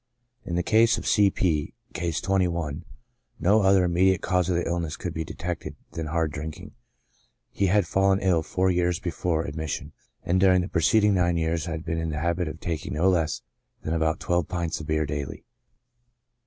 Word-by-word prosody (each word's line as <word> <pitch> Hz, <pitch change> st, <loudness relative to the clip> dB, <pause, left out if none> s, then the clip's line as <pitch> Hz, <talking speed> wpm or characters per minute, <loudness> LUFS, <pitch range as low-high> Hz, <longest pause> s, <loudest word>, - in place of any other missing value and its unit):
In 85 Hz, -, -3 dB
the 90 Hz, -, +1 dB
case 115 Hz, +4 st, +4 dB
of -, -, -6 dB
C. 100 Hz, -2 st, +4 dB
P 80 Hz, -6 st, -1 dB
—, -, -, -34 dB
(Case 85 Hz, -3 st, -2 dB
21,) 85 Hz, -4 st, -1 dB, 0.5 s
no 105 Hz, +6 st, +4 dB
other 95 Hz, -1 st, +4 dB
immediate 90 Hz, +1 st, +3 dB
cause 90 Hz, -1 st, +1 dB
of 90 Hz, -, +1 dB
the 85 Hz, -, -1 dB
illness 85 Hz, -3 st, -2 dB
could -, -, -4 dB
be 80 Hz, -, -2 dB
detected 85 Hz, +2 st, -5 dB, 0.2 s
than 80 Hz, -1 st, -4 dB
hard 80 Hz, -1 st, 0 dB
drinking; 75 Hz, +1 st, -7 dB, 0.8 s
he 100 Hz, -, 0 dB
had 100 Hz, 0 st, +3 dB
fallen 95 Hz, +2 st, +2 dB
ill 90 Hz, -4 st, +2 dB
four 95 Hz, +4 st, 0 dB
years 90 Hz, -1 st, +1 dB
before 85 Hz, -2 st, -1 dB
ad 70 Hz, -, -6 dB
mission, 80 Hz, -1 st, -4 dB, 0.3 s
and 90 Hz, +2 st, +1 dB
during 95 Hz, -1 st, +5 dB
the 90 Hz, -, -3 dB
preceding 105 Hz, +5 st, +3 dB
nine 85 Hz, -2 st, +2 dB
years 80 Hz, 0 st, -1 dB
had 80 Hz, -1 st, -5 dB
been 80 Hz, 0 st, -2 dB
in 80 Hz, 0 st, -2 dB
the 75 Hz, -, -3 dB
habit 85 Hz, +2 st, 0 dB
of 80 Hz, +1 st, -6 dB
taking 80 Hz, -3 st, -4 dB
no 85 Hz, +5 st, +3 dB
less 80 Hz, -3 st, 0 dB, 0.4 s
than 80 Hz, -, -2 dB
about 80 Hz, -1 st, 0 dB
twelve 85 Hz, -2 st, 0 dB
pints 85 Hz, -2 st, -2 dB
of 80 Hz, -, -8 dB
beer 80 Hz, 0 st, +1 dB
daily. 70 Hz, -1 st, -5 dB
85 Hz, 195 wpm, -26 LUFS, 80-90 Hz, 0.8 s, during